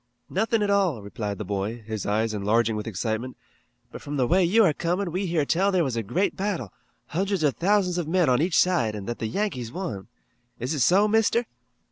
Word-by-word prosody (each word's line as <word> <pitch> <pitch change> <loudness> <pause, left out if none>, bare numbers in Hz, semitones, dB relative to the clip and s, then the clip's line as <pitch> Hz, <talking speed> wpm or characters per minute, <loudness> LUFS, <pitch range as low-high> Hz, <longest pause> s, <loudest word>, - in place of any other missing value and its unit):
"Nothin' 220 +3 +1
at 200 - +1
all," 185 - +1
replied 100 -1 -4
the 105 - -5
boy, 105 +4 -3
his 110 -1 -4
eyes 110 +2 0
enlarging 110 +2 +1
with 105 +1 -4
excitement, 110 +4 -3 0.5
"but - - -9
from 145 0 -5
the 130 - +2
way 180 +8 +3
you 210 +6 +4
are 160 - +3
comin' 175 +3 -1
we 185 +3 -2
heard 160 -4 0
tell 195 +4 +2
there 185 -3 +2
was 130 -5 -2
a 115 - 0
great 120 - -1
battle, 190 - -3 0.4
hundreds 190 +1 -1
of 140 -5 +2
thousands 180 - +1
of 165 - -3
men 175 0 +2
on 125 +1 +3
each 170 +1 +1
side 125 -13 +2
an' 100 -2 -6
that 120 +2 -4
the 110 - -2
Yankees 125 - -2
won. 115 - -5 0.5
Is 125 +6 -3
it 150 - -2
so, 190 - +4
Mister?" 225 +2 +2
150 Hz, 215 wpm, -25 LUFS, -, 0.5 s, you